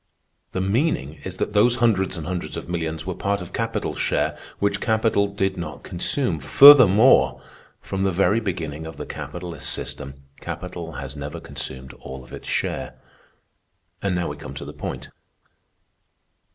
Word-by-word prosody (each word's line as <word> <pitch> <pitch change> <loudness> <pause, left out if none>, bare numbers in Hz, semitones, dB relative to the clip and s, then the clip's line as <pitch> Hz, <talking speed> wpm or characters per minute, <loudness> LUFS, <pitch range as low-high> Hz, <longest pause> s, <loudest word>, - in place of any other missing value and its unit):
The 95 - -1
meaning 95 - 0
is 95 -1 -5
that 105 - -2
those 115 +4 +4
hundreds 105 -7 +2
and 80 - -5
hundreds 90 0 -4
of - - -6
millions 80 -2 -3
were 95 - -2
part 100 +3 -1
of 90 -1 -9
capital's 115 -1 -2
share - - 0 0.2
which 100 - 0
capital 110 -2 +2
did 95 -1 -1
not 85 - -6
consume. 90 - -1
Furthermore, 125 - +8 0.4
from 95 - -4
the 95 0 +2
very 95 +4 +3
beginning 80 -7 -4
of 80 - -9
the - - -5
capitalist 85 -4 -6
system, 70 -1 -5 0.2
capital 85 -2 -6
has 70 -1 -6
never 70 0 -6
consumed 65 0 -7
all 65 0 -8
of 65 - -15
its - - -9
share. - - -2 1.1
"And 100 -2 0
now 90 -1 -1
we 75 - -6
come 75 -2 -9
to - - -6
the - - -8
point. - - -6
90 Hz, 160 wpm, -23 LUFS, 80-100 Hz, 1.1 s, Furthermore